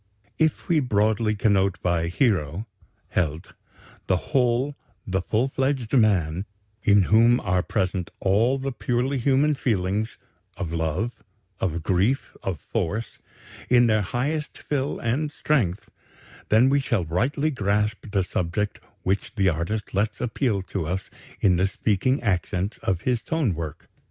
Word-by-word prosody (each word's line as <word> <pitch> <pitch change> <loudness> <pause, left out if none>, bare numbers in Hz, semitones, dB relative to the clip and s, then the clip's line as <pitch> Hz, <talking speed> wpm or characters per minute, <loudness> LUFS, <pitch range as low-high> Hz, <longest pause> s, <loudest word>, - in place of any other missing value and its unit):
If 160 -2 +1
we 165 -3 +3
broadly 110 -3 +1
connote 100 -3 +2
by 85 -2 +1
'hero' 90 - 0 0.4
('Held') 80 -2 -2 0.5
the 95 - +3
whole, 125 - +1 0.3
the 95 0 -1
full 115 +4 +1
fledged 135 -3 -1
man, 95 - +3 0.4
in 100 -1 +5
whom 115 +5 +5
are 90 0 +1
present 95 -1 -1
all 110 +7 +3
the 135 0 -3
purely 125 +3 -1
human 140 +4 +3
feelings 105 -4 -1 0.4
of 85 -4 -4
love, 85 +8 -1 0.5
of 85 -3 -1
grief, 100 +10 +1
of 95 -5 -3
force 105 +11 -3 0.5
in 120 -1 +6
their 110 -2 +3
highest 145 - -2
fill 140 -1 -2
and 140 +6 -1
strength, 115 - 0 0.6
then 110 +4 +5
we 140 +1 +3
shall 120 -10 0
rightly 135 - 0
grasp 105 -2 -1
the 100 -2 +1
subject 90 +4 -2 0.2
which 95 +2 -1
the 95 -3 +3
artist 90 +6 -3
lets 105 +3 0
appeal 115 -4 0
to 95 -4 -4
us 95 +3 -3 0.3
in 90 -3 +4
the 95 +2 +3
speaking 110 +8 0
accents 95 -1 -1
of 90 -3 -1
his 125 -3 0
tone 155 - 0
work. 80 -2 -6
105 Hz, 140 wpm, -25 LUFS, 90-125 Hz, 0.6 s, in